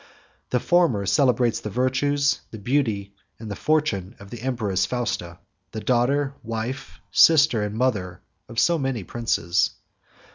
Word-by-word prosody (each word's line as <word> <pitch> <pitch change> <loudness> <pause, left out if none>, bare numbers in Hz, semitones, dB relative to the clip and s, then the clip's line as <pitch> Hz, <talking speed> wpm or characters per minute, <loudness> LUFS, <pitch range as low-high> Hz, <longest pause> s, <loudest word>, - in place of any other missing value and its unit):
The 125 - +1
former 125 - +2
celebrates 120 +3 +2
the 105 - -6
virtues, 140 +5 +1
the 110 - -9
beauty, 105 -4 -1 0.2
and 110 -2 -8
the - - -3
fortune 125 -11 0
of 100 0 -13
the 120 - -8
empress 110 -7 -1
Fausta, 115 -9 -3 0.4
the 110 - -4
daughter, 135 +4 +1
wife, 115 +4 -5
sister, 150 -8 +5
and 105 0 -3
mother 105 -8 -1 0.3
of 115 - -10
so 170 +4 +3
many 135 -6 -2
princes. 95 -6 0
120 Hz, 140 wpm, -24 LUFS, 105-135 Hz, 0.4 s, sister